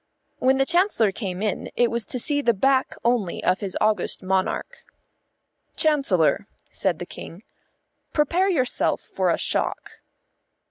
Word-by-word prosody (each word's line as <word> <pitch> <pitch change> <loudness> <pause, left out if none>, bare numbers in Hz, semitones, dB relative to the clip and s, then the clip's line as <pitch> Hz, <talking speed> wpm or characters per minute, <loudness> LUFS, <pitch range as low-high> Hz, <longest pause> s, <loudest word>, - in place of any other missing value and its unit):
When 265 +1 +3
the 270 - +3
Chancellor 340 - +2
came 190 -1 -4
in 210 - -2
it 240 -1 +2
was 235 -2 -2
to - - -2
see 290 +4 +1
the 235 -5 +2
back 265 +5 +2
only 235 -7 0
of 185 - +2
his 195 -3 -4
august 215 -2 0
monarch. 190 - -1 1.0
"Chancellor," 215 - +2 0.2
said 185 -4 -1
the 175 - -6
King, 175 +3 -10 0.7
"prepare 345 +6 +2
yourself 260 -9 0
for - - -1
a - - +2
shock." - - -2
235 Hz, 140 wpm, -24 LUFS, 190-280 Hz, 1.0 s, When